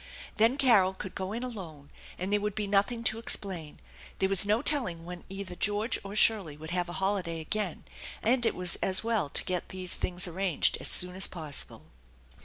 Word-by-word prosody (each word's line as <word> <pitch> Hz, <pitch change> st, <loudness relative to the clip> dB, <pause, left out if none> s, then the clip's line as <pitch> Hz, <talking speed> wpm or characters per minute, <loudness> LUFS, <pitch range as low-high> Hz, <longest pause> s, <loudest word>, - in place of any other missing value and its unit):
Then 230 Hz, +5 st, +3 dB
Carol 215 Hz, -9 st, +4 dB
could 190 Hz, -, -7 dB
go 190 Hz, 0 st, -4 dB
in 235 Hz, +3 st, -4 dB
alone, 170 Hz, -, -8 dB, 0.3 s
and 185 Hz, +3 st, -3 dB
there 210 Hz, -, +3 dB
would 210 Hz, -1 st, -2 dB
be 215 Hz, -, -1 dB
nothing 205 Hz, +4 st, +1 dB
to 225 Hz, 0 st, 0 dB
ex 230 Hz, -, +1 dB
plain. 170 Hz, -7 st, -8 dB, 0.4 s
There 190 Hz, -, +1 dB
was 195 Hz, 0 st, +4 dB
no 215 Hz, +5 st, +2 dB
telling 235 Hz, -, +1 dB
when 175 Hz, 0 st, -8 dB
either 195 Hz, -1 st, -6 dB
George 210 Hz, +5 st, 0 dB
or 200 Hz, +1 st, -7 dB
Shirley 200 Hz, -9 st, +3 dB
would 160 Hz, +2 st, -9 dB
have 175 Hz, -1 st, -1 dB
a -, -, -6 dB
holiday 190 Hz, -4 st, -1 dB
again, 180 Hz, +2 st, -2 dB, 0.4 s
and 240 Hz, +2 st, +3 dB
it 230 Hz, -, +3 dB
was 180 Hz, -1 st, +2 dB
as 190 Hz, +2 st, +1 dB
well 225 Hz, -9 st, 0 dB
to -, -, 0 dB
get 180 Hz, -1 st, -2 dB
these 185 Hz, -1 st, -2 dB
things 180 Hz, 0 st, -1 dB
arranged 180 Hz, -1 st, +1 dB
as -, -, +1 dB
soon 180 Hz, 0 st, +4 dB
as 190 Hz, -, +4 dB
possible. 155 Hz, -5 st, -6 dB
190 Hz, 205 wpm, -29 LUFS, 175-215 Hz, 0.4 s, Carol